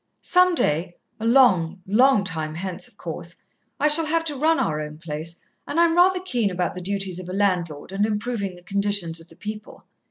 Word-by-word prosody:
Some 365 -1 +4
day 170 - 0 0.2
a 225 - -2
long, 190 -9 +4
long 230 +2 +4
time 160 -4 -3
hence, 185 +1 -5
of - - -22
course - - -7 0.4
I 300 - +3
shall 310 +1 +6
have 325 +1 0
to 300 -3 -2
run 315 +4 +2
our 155 -1 -1
own 150 0 -7
place, 160 +1 -6 0.3
and 325 - -1
I'm 335 -1 +4
rather 365 +1 +5
keen 245 - 0
about 180 -1 -2
the 180 - -7
duties 195 -1 -3
of 180 -1 -8
a - - -5
landlord, 180 -6 -1
and 195 +1 0
improving 210 -2 -2
the 175 - -16
condition 200 -3 -1
of 165 - -16
the 165 - -18
people. 210 +3 -8
200 Hz, 200 wpm, -23 LUFS, 175-260 Hz, 0.4 s, shall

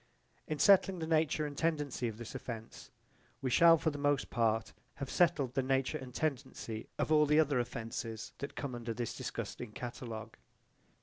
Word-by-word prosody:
In 155 - -2
settling 195 +2 +5
the 160 - -3
nature 160 -1 +2
and 145 -1 -5
tendency 150 -6 0
of 110 -2 -5
this 120 -1 -8
offence 115 -4 -7 0.5
we 130 -2 -2
shall 165 +5 +7
for 160 0 0
the 145 - -6
most 145 -1 +1
part 115 -2 +1 0.2
have 140 -2 -5
settled 155 -8 +3
the 135 - +2
nature 135 0 0
and 130 -1 -8
tendency 130 -6 -3
of - - -1
all 150 -1 +6
the 150 +1 +5
other 145 -4 +3
offences 115 -1 -4
that 140 - -5
come 140 -3 -4
under 120 -1 -4
this 120 0 -3
disgusting 120 -3 -5
catalogue. 115 -2 -6
135 Hz, 175 wpm, -33 LUFS, 120-150 Hz, 0.5 s, shall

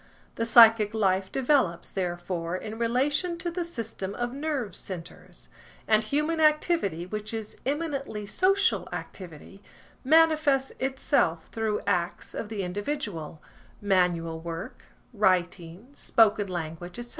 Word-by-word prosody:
The 230 - -2
psychic 225 -2 +7
life 190 -2 +1
develops, 260 - +1
therefore, 175 -2 -3
in 215 +4 -7
relation 285 +9 0
to 345 +1 -3
the 350 +1 -2
system 225 - -5
of 240 0 -3
nerve 280 -6 -3
centres; 180 -4 -9 0.4
and 215 0 +4
human 300 +8 -1
activity 305 - +2
which 210 +3 -5
is 220 -1 -6
eminently 275 -7 -3
social 385 - +2
activity, 185 +2 -9 0.4
manifests 310 -2 +4
itself 260 - 0
through 220 -2 -1
acts 180 -3 -1
of 210 - -5
the 210 -3 -3
individual–manual 180 - -2
work, 165 0 -7 0.3
writing, 185 0 0
spoken 215 -6 +2
language, 175 0 -6
etc. 240 0 -7
215 Hz, 115 wpm, -27 LUFS, 180-275 Hz, 0.4 s, psychic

